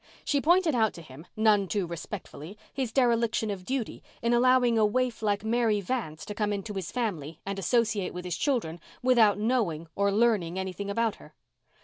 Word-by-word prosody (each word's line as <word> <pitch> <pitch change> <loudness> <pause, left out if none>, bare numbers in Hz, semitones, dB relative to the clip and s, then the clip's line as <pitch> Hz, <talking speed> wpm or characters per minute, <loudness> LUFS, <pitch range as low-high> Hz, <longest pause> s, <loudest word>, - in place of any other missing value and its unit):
She 285 -1 +1
pointed 345 0 +3
out 220 -3 +2
to 170 - -10
him, 155 +3 -13
none 215 -3 +3
too 200 0 -1
respectfully, 170 +1 -8 0.2
his 260 -4 -2
dereliction 230 -3 +2
of 190 -2 -6
duty 255 +2 -3 0.2
in 235 +1 +2
allowing 245 -1 +4
a - - +4
waif 245 +3 0
like 205 -1 0
Mary 225 -1 +1
Vance 195 -7 -4
to 210 - -5
come 210 0 -1
into 205 +1 -4
his 190 -4 -5
family 165 - -3
and 195 0 -3
associate 215 -2 +1
with 180 0 -7
his 180 -1 -2
children 220 - -1 0.2
without 230 -6 +5
knowing 210 -8 0
or 200 0 +1
learning 205 -5 +2
anything 190 +1 -4
about 225 +1 0
her. - - -16
210 Hz, 185 wpm, -28 LUFS, 190-235 Hz, 0.2 s, without